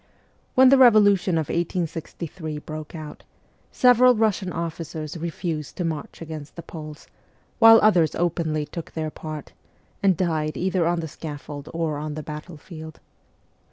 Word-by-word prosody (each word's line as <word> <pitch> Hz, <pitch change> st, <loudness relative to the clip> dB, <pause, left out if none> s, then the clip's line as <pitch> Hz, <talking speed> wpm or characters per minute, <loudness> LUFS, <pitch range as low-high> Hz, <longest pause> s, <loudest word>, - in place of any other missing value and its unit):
When 260 Hz, 0 st, +7 dB
the 275 Hz, 0 st, +6 dB
revolution 205 Hz, -7 st, +5 dB
of 160 Hz, -3 st, 0 dB
1863 165 Hz, -1 st, -3 dB
broke 155 Hz, +1 st, -8 dB
out, 155 Hz, -2 st, -8 dB, 0.5 s
several 250 Hz, 0 st, +5 dB
Russian 210 Hz, -4 st, +1 dB
officers 165 Hz, -2 st, -5 dB
refused 165 Hz, -2 st, -4 dB
to 180 Hz, -, -2 dB
march 160 Hz, 0 st, -5 dB
against 155 Hz, -2 st, -8 dB
the 170 Hz, -, -8 dB
Poles, 155 Hz, -2 st, -9 dB, 0.5 s
while 225 Hz, -1 st, +9 dB
others 175 Hz, -8 st, +4 dB
openly 160 Hz, -3 st, -1 dB
took 170 Hz, +2 st, -8 dB
their 155 Hz, -1 st, -3 dB
part, 155 Hz, -2 st, -8 dB, 0.5 s
and 190 Hz, -4 st, +3 dB
died 155 Hz, -4 st, -1 dB
either 185 Hz, -2 st, +1 dB
on 170 Hz, 0 st, 0 dB
the 160 Hz, -, -4 dB
scaffold 145 Hz, -1 st, -8 dB
or 160 Hz, -3 st, -2 dB
on 150 Hz, 0 st, -5 dB
the 155 Hz, -, -5 dB
battlefield. 155 Hz, +1 st, -9 dB
165 Hz, 140 wpm, -24 LUFS, 155-180 Hz, 0.5 s, while